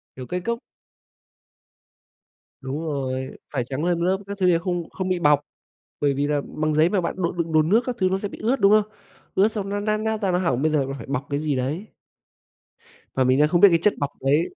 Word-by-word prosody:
Kiểu, 130 - -7
cái 180 0 -3
cốc 235 0 -1 2.0
Đúng 135 +3 -4
rồi, 130 -4 -3 0.2
phải 130 -4 0
tráng 135 +6 -3
lên 175 -1 +1
một 170 - 0
lớp 190 +1 +2
các 200 0 -5
thứ 185 - +1
thì 170 -2 +5
không 175 -2 -3
không 185 -1 -4
bị 180 -1 0
bọc, 145 -2 +4 0.6
bởi 145 -1 +2
vì 140 +1 0
là 145 0 +1
bằng 155 0 -2
giấy 155 +2 +4
mà 190 +1 +1
bạn, 170 - -2
đồ 175 -2 -1
đựng 170 -2 -3
đồ 155 -1 +5
nước 205 +9 +3
các 250 -1 -2
thứ 185 -1 +3
nó 190 - +1
sẽ 205 - -4
bị - - -10
ướt, 240 +2 +1
đúng 200 +1 +5
không? 215 0 +3 0.4
Ướt 200 +3 +4
xong 200 -3 -3
nó 205 0 -2
nát 215 0 0
nát 220 0 -2
ra, 190 - +1
nó 180 - +2
hỏng, 160 -8 0
bây 155 - +2
giờ 145 -3 +2
là 135 +1 -5
phải - - -9
bọc 140 0 -3
cái 140 - 0
gì 150 -3 -1
đấy. 150 +11 -2 1.3
Và 130 - +3
mình 130 +2 +3
đang 150 +1 +4
không 175 +1 +2
biết 200 - +10
cái 165 -1 +3
chất 210 - +3
bọc 145 -1 -1
đấy 145 +5 +1
170 Hz, 250 wpm, -23 LUFS, 145-195 Hz, 2.0 s, biết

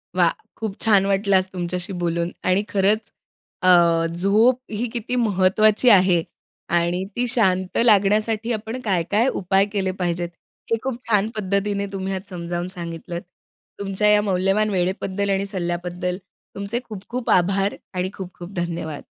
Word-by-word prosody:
वाह! 175 -2 +4 0.3
खूप 220 -3 -4
छान 205 -4 +4
वाटलं 195 0 +3
आज 185 - 0
तुमच्याशी 180 +1 -3
बोलून 170 0 0
आणि 185 +2 +2
खरंच 205 +2 +1 0.5
अ, 185 - +1 0.5
झोप 210 +8 +3
ही 220 +3 -2
किती 240 +1 -3
महत्त्वाची 215 +1 +3
आहे 185 -5 +5 0.5
आणि 170 +2 0
ती 245 - 0
शांत 190 -7 +1
लागण्यासाठी 215 +2 +3
आपण 225 +3 -4
काय-काय 205 +2 +1
उपाय 195 +1 +3
केले 190 -2 0
पाहिजेत 175 -1 -1 0.4
हे 230 - +3
खूप 255 -2 -3
छान 210 -1 +2
पद्धतीने 200 0 -1
तुम्ही 195 0 -3
आज 190 - -4
समजावून 175 -1 -4
सांगितलंत. 170 -1 -6 0.6
तुमच्या 200 +1 0
या 210 0 +5
मौल्यवान 195 +2 +1
वेळेबद्दल 190 +1 -1
आणि 195 0 +1
सल्ल्याबद्दल 180 -1 -3 0.4
तुमचे 200 +4 -3
खूप 205 -3 -8
खूप 245 0 -4
आभार 195 +2 +2 0.2
आणि 180 0 -1
खूप 185 -2 -8
खूप 175 +3 -9
धन्यवाद. 170 -4 -4
195 Hz, 145 wpm, -22 LUFS, 180-210 Hz, 0.6 s, आहे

